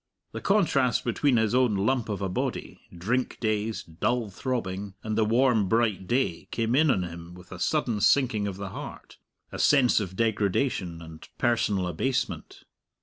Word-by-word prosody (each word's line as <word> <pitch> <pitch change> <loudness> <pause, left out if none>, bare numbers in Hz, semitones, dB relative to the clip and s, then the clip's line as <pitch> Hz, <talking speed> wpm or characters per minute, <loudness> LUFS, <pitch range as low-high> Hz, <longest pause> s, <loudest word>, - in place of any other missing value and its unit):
The - - -6
contrast 140 - +2
between 125 +2 +1
his 110 0 +1
own 125 -4 +3
lump 115 +4 0
of 100 -1 -3
a - - 0
body, 90 - -4
drink 115 +9 -2
dazed, 110 -6 -3
dull 120 -4 0
throbbing, 100 -4 -4
and 110 -1 -2
the 110 - +3
warm, 115 -2 +2
bright 110 -5 +1
day 120 -8 -1
came 115 +1 0
in 155 +2 +4
on 95 -8 +2
him 85 0 -8
with 90 -1 -15
a 95 - -8
sudden 120 -8 0
sinking 115 -7 +3
of 95 -2 -5
the 100 -1 -5
heart, - - -9 0.3
a - - -7
sense 135 -6 +4
of 95 -3 -5
degradation 100 -5 0
and 80 -1 -12
personal 105 -5 +1
abasement. 125 +10 -3
110 Hz, 165 wpm, -27 LUFS, 95-125 Hz, 0.3 s, in